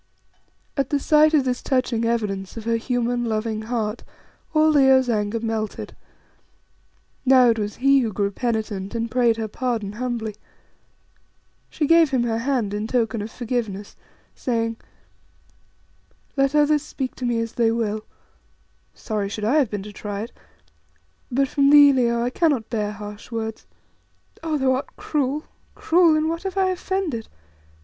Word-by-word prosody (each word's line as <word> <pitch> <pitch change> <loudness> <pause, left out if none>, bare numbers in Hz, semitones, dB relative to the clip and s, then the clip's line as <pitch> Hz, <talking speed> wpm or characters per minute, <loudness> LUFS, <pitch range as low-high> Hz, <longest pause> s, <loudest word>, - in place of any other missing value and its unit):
At 275 -3 -1
the 290 - +1
sight 305 +2 +4
of 280 -3 +3
this 250 -1 -1
touching 250 -3 0
evidence 210 -4 -2
of 225 - -5
her 230 0 +1
human, 240 0 -1
loving 220 -1 -2
heart 220 -1 -3 0.5
all 310 0 +4
Leo's 265 -3 +5
anger 210 +1 -1
melted. 225 -1 -4 1.3
Now 255 -2 +6
it 225 - -2
was 205 0 -3
he 275 +1 +4
who 230 -4 -1
grew 200 0 -1
penitent 215 -3 -3
and 230 0 -2
prayed 240 -2 +3
her 220 -1 -2
pardon 225 -2 -2
humbly. 230 -1 -3 1.4
She 305 - -1
gave 330 0 +5
him 260 -3 +1
her 225 -1 -1
hand 235 -5 -1
in 210 +1 -2
token 230 -2 0
of 210 - -5
forgiveness, 220 -5 -4 0.4
saying 230 -2 -2 1.6
"Let 275 +1 +2
others 300 0 +4
speak 265 -3 -5
to 255 - -4
me 235 -1 0
as 230 0 -3
they 230 -2 +2
will" 215 -2 -2 0.9
(sorry 210 -3 -3
should 210 +1 -4
I 255 +8 +3
have 275 -7 +3
been 205 -2 -4
to 210 0 -10
try 205 -1 -5
it!) 230 - -6 1.0
"but 270 +2 +2
from 280 +1 +2
thee, 290 -1 +8
Leo, 235 -2 +1
I 245 - -1
cannot 285 -8 +1
bear 210 -3 -1
harsh 210 0 -9
words. 220 -1 -5 0.7
Oh, 320 -2 -1
thou 265 -2 +2
art 260 +2 -3
cruel, 290 0 -1 0.3
cruel. 335 -1 +4
In 310 0 +1
what 330 +1 -2
have 385 0 -5
I 380 -1 +3
offended? 365 - -3
235 Hz, 155 wpm, -23 LUFS, 220-275 Hz, 1.6 s, thee